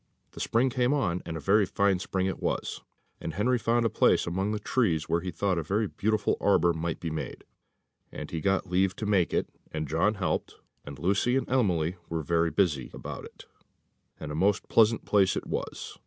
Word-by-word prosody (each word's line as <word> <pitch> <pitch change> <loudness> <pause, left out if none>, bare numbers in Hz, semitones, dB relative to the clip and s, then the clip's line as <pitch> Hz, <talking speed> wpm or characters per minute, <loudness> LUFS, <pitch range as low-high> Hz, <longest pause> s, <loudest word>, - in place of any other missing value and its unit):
The - - -11
spring 125 +3 +1
came 125 +3 +2
on, 90 -11 0
and 80 -1 -4
a - - -5
very 100 +6 +3
fine 100 -1 +2
spring 95 0 -1
it 95 - -3
was; - - -2 0.4
and 80 - -5
Henry 125 +5 +2
found 115 +1 +1
a - - +3
place - - +3
among 95 +4 -1
the 110 - -1
trees 105 -8 0
where 85 - +1
he 95 - -4
thought 90 +1 0
a - - -3
very 100 +8 0
beautiful 105 +1 0
arbour 85 -4 +4
might 80 0 -3
be 80 - -4
made, 80 - -5 0.7
and - - -7
he 80 - -3
got 95 +1 +1
leave 95 +1 +1
to 110 - -4
make 95 -6 +2
it, - - 0 0.2
and 75 -1 -3
John 85 +9 +1
helped, 95 -3 -2 0.3
and 70 -1 -8
Lucy 100 - +1
and 135 - -1
Emily 90 -9 +1
were 80 -1 -2
very 85 +1 +2
busy 75 -6 +1
about - - -7
it, - - -14 0.7
and 75 - -6
a - - -4
most 95 +5 +1
pleasant 115 0 +4
place 95 -3 +3
it - - -4
was. - - -5
95 Hz, 205 wpm, -28 LUFS, 85-105 Hz, 0.7 s, arbour